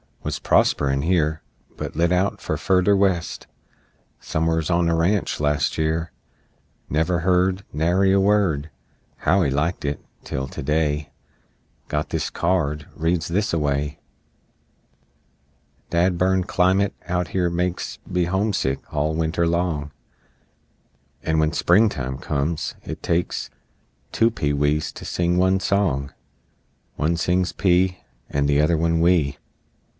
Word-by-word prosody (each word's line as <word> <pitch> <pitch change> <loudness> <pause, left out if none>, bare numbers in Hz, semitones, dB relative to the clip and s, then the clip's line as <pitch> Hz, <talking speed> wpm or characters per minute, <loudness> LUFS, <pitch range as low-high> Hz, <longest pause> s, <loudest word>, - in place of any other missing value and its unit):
Wuz - - -3
prosper'n 70 -1 +2
here, 80 -2 +1 0.4
But - - -5
lit 85 +2 +2
out 90 +2 0
on - - 0
furder 95 +1 +3
West 95 -4 0 0.7
Somers 80 0 -1
on 85 -1 +2
a 85 - +2
ranch, 90 +5 +1
last 75 -2 0
year: 80 +1 -1 0.8
Never 80 +3 +1
heard 90 +2 +2
Nary 90 +6 +2
a 100 - +4
word 95 -7 +2 0.5
How 95 +1 +2
he 70 - +1
liked 75 +6 -1
it, 70 -1 -2 0.2
tel 65 0 -4
to - - -6
day, 75 0 0 0.8
Got 75 0 -2
this - - -2
card, 75 -4 0
reads 80 0 0
thisaway: 75 -7 -1 1.9
"Dad 85 +1 +2
burn 95 0 +2
climate 95 +2 +2
out 90 -1 -1
here 90 -2 0
makes 90 +1 -2
Me 90 -1 0
homesick 95 -7 0
all 75 +1 0
Winter 80 +1 0
long, 85 -4 -1 1.3
And 80 0 0
when 80 0 +2
Springtime 85 - +2
comes, 75 +2 -2
it - - -7
takes 85 0 -1 0.6
Two 115 +1 +3
pee 75 -10 -1
wees 75 +2 +1
to - - -9
sing 85 0 0
one 95 +1 +3
song, 85 -10 0 0.8
One 80 +3 0
sings 90 +2 +1
'pee' 90 -1 +2 0.3
And 70 0 0
the 70 0 +3
other 80 +2 +2
one 85 +1 +1
'wee!' 85 -5 +2
85 Hz, 130 wpm, -23 LUFS, 75-90 Hz, 1.9 s, a